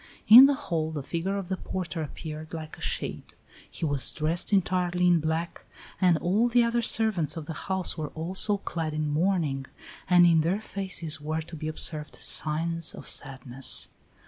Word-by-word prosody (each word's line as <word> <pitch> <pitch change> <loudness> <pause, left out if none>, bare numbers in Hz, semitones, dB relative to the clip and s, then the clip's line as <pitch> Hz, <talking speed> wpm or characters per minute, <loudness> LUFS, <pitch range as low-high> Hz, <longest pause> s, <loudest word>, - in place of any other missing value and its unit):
In 250 +5 +11
the 285 - +1
hall 160 -10 -3
the 150 -3 -5
figure 175 +7 -3
of 195 -3 -5
the 190 0 -3
porter 175 -4 -5
appeared 155 +1 -7
like 155 -1 -8
a - - -17
shade; - - -4 0.3
he - - -5
was 145 -3 +3
dressed 160 +5 -2
entirely 180 -2 +1
in 175 -1 +4
black, 160 +2 -3 0.4
and 180 -3 +4
all 195 +9 +1
the 240 0 +4
other 235 0 0
servants 210 -9 +1
of 160 - -6
the 160 - -6 0.2
house 190 -3 -1
were 150 -2 -4
also 190 +6 +1
clad 160 -5 -4
in 155 0 -1
mourning, 155 -5 0 0.4
and 175 -1 +6
in 165 -2 +4
their 175 +6 0
faces 185 -7 -3
were 155 +2 -3
to 160 +1 -10
be 155 0 -6
observed 155 -1 -1
signs 165 +1 0
of - - -11
sadness. 135 -1 0
165 Hz, 175 wpm, -27 LUFS, 155-185 Hz, 0.4 s, In